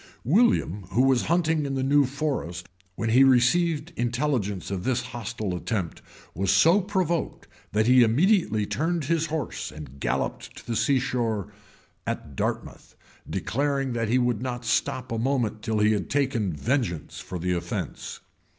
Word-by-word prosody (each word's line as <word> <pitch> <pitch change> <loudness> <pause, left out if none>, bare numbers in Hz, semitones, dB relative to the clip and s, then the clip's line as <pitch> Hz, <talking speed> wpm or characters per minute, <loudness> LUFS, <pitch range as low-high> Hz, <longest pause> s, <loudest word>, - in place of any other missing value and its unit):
} - - -34
William, 150 - +2
who 125 - +4
was 135 -2 +3
hunting 160 -2 +1
in 140 -1 -2
the 130 - -1
new 140 +1 +4
forest 130 - -3 0.3
when 115 - -2
he 125 +4 +6
received 150 +5 +3
intelligence 120 - -1
of 95 -2 -3
this 125 0 0
hostile 110 -4 -4
attempt, 90 -3 -3 0.3
was 95 +3 -1
so 170 - +5
provoked, 180 -4 -2 0.2
that 110 +1 +2
he 125 +1 +6
immediately 120 - +3
turned 165 +6 -1
his 165 +2 +1
horse, 155 -1 -4
and 70 -3 -10
galloped 65 +1 -2
to - - -12
the 120 - -3
sea 140 +5 +3
shore 115 -6 -2 0.5
at 70 -3 -4
Dartmouth, - - -4 0.3
declaring 135 0 -1
that 115 -2 -1
he 125 - +3
would 120 -3 +1
not 125 -2 -4
stop 125 +2 0
a 115 - -1
moment 120 -4 0
till 110 0 -1
he 105 0 +4
had 100 -5 -1
taken, 130 -8 0
vengeance 110 - -2
for 90 - -6
the 90 +1 -1
offence. 85 0 -4
125 Hz, 160 wpm, -26 LUFS, 105-145 Hz, 0.5 s, he